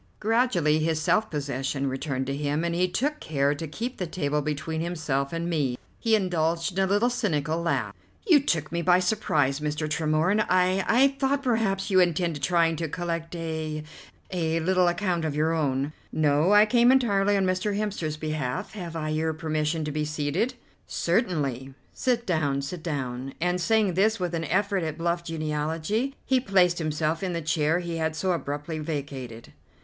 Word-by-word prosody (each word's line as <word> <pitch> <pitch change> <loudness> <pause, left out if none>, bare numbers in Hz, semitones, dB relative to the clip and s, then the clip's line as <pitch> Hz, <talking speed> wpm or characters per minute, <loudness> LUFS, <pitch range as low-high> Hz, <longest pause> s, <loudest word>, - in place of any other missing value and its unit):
Gradually 210 -9 +2
his 160 0 0
self 215 +7 +2
possession 140 -2 -2
returned 135 0 -2
to 135 +1 -2
him, 145 +1 -1
but 170 0 -1
he 180 +2 +2
took 290 +11 -1
care 140 -2 +1
to 160 +2 -5
keep 235 - -5
the 180 - -3
table 150 -3 -1
between 155 +2 -3
himself 155 -5 -2
and 165 0 -3
me. 145 -7 0 0.2
He 225 -1 +3
indulged 170 -3 0
in - - +4
a - - +1
little 205 +6 +2
cynical 160 - -1
laugh. 170 - -1 0.3
"You 335 -9 +6
took 160 - -1
me 170 0 -1
by 180 +1 +5
surprise, 155 -8 +1
Mr. 150 +1 -2
Tremorne. 160 +6 +1
I 185 +1 +3
I 265 +4 +5
thought 275 +1 +1
perhaps 220 -6 0
you 185 - +5
intended 170 -3 +1
trying 165 +2 +2
to 165 -1 -3
collect 170 0 -3
a 160 -2 -4 0.5
a 165 -3 0
little 180 +1 +3
account 175 -1 0
of 155 -2 -2
your 155 +2 +1
own." 140 -2 0 0.2
"No, 150 +3 +2
I 210 +1 +7
came 240 +2 +5
entirely 205 -6 +3
on 195 - +2
Mr. 185 +2 0
Hemster's 190 -8 -2
behalf. 155 -5 -3
Have 175 -5 -6
I 155 -1 -2
your 160 +1 0
permission 155 0 -1
to 150 - -3
be 150 +1 -1
seated?" 155 - -1 0.3
"Certainly. 145 - -1 0.2
Sit 245 -2 0
down, 145 -6 0
sit 165 +5 -5
down," 135 -4 -4
and, 180 +1 0
saying 210 +1 +2
this 215 +5 +2
with 180 -1 -2
an 165 -1 -2
effort 195 +4 +1
at 155 -2 -3
bluff 170 0 -1
geniality, 160 - -2
he 260 -1 +3
placed 185 -6 +3
himself 155 0 -1
in 185 -2 -2
the 170 - -1
chair 155 +1 +1
he 170 -2 -3
had 160 -1 -1
so 185 +3 0
abruptly 150 -1 -3
vacated. 135 -6 -6
165 Hz, 180 wpm, -26 LUFS, 150-185 Hz, 0.5 s, I